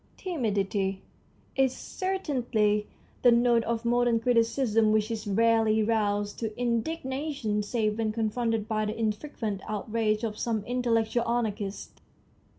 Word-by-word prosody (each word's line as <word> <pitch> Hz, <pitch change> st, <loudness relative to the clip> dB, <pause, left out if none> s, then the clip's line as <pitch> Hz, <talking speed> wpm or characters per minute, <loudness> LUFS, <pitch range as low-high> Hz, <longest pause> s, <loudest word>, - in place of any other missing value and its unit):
Timidity 200 Hz, -, -1 dB, 0.5 s
is 265 Hz, -1 st, +2 dB
certainly 245 Hz, -, -1 dB, 0.3 s
the 245 Hz, -, +6 dB
note 235 Hz, 0 st, +4 dB
of 230 Hz, 0 st, -2 dB
modern 240 Hz, -1 st, +3 dB
criticism, 230 Hz, -1 st, +2 dB
which 215 Hz, +1 st, +1 dB
is 215 Hz, -2 st, -4 dB
rarely 220 Hz, +1 st, +3 dB
roused 205 Hz, -2 st, 0 dB
to 220 Hz, 0 st, -4 dB
indignation 260 Hz, -1 st, -1 dB
save 215 Hz, 0 st, -1 dB
when 220 Hz, -1 st, +1 dB
confronted 225 Hz, 0 st, -1 dB
by 215 Hz, -1 st, 0 dB
the 215 Hz, +2 st, -3 dB
infrequent 215 Hz, -2 st, -2 dB
out 215 Hz, +1 st, -4 dB
rage 215 Hz, -1 st, +1 dB
of 215 Hz, -2 st, -3 dB
some 220 Hz, -3 st, -1 dB
intellectual 235 Hz, -1 st, 0 dB
anarchist. 210 Hz, -4 st, -3 dB
225 Hz, 125 wpm, -28 LUFS, 215-240 Hz, 0.5 s, the